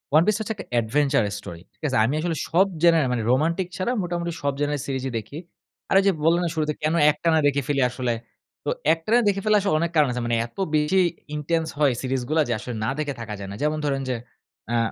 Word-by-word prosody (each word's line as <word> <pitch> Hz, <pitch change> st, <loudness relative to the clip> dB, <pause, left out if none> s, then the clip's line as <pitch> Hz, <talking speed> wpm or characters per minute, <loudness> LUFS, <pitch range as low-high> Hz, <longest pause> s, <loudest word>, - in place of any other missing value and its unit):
One 155 Hz, -, +7 dB
Piece 215 Hz, -1 st, +3 dB
হচ্ছে 220 Hz, 0 st, -2 dB
একটা 195 Hz, -, -9 dB
adventure 140 Hz, +2 st, +1 dB
story 85 Hz, -4 st, -9 dB
ঠিক -, -, -38 dB
আছে? 130 Hz, -, 0 dB
আমি 125 Hz, -, 0 dB
আসলে 165 Hz, +1 st, -1 dB
সব 180 Hz, +4 st, +4 dB, 0.2 s
genre 165 Hz, -1 st, +5 dB
এ -, -, 0 dB
মানে 120 Hz, -2 st, -1 dB
রোমান্টিক 165 Hz, +7 st, +1 dB
ছাড়া 190 Hz, +5 st, -1 dB
মোটামুটি 175 Hz, -1 st, -2 dB
সব 140 Hz, -1 st, 0 dB
genre 145 Hz, 0 st, 0 dB
এর -, -, -5 dB
সিরিজই 135 Hz, -1 st, -2 dB
দেখি। 110 Hz, +6 st, -7 dB, 0.5 s
আর -, -, +2 dB
ঐযে 195 Hz, 0 st, +4 dB
বললাম 170 Hz, +2 st, +4 dB
না -, -, 0 dB
শুরুতে 155 Hz, -1 st, 0 dB
কেন 155 Hz, +1 st, +1 dB, 0.2 s
একটানা 160 Hz, +2 st, +1 dB
দেখে 140 Hz, 0 st, +1 dB
ফেলি 140 Hz, -2 st, +1 dB
আসলে? 125 Hz, -1 st, -2 dB, 0.5 s
তো -, -, 0 dB, 0.2 s
একটানা 190 Hz, +9 st, +2 dB
দেখে 200 Hz, -1 st, +1 dB
ফেলার 215 Hz, -1 st, +4 dB
আসলে 195 Hz, -5 st, 0 dB
অনেক 170 Hz, +1 st, -1 dB
কারণ 150 Hz, -2 st, +5 dB
আছে। 125 Hz, 0 st, -3 dB
মানে 120 Hz, 0 st, +1 dB
এত 115 Hz, -, -15 dB, 0.2 s
বেশি 150 Hz, +5 st, +3 dB, 0.4 s
intense 160 Hz, +2 st, -1 dB
হয় 145 Hz, -4 st, +4 dB
সিরিজগুলা। 130 Hz, +4 st, 0 dB
যে 120 Hz, -, 0 dB
আসলে 120 Hz, 0 st, -6 dB
না 110 Hz, -, 0 dB
দেখে 145 Hz, -2 st, -1 dB
থাকা 110 Hz, -2 st, -5 dB
যায় 100 Hz, -, -6 dB
না। -, -, -6 dB
যেমন 150 Hz, +1 st, +1 dB
ধরেন 135 Hz, -1 st, 0 dB
যে, 125 Hz, -, 0 dB, 0.5 s
অ্যা 120 Hz, -, +1 dB
150 Hz, 230 wpm, -24 LUFS, 130-170 Hz, 0.5 s, One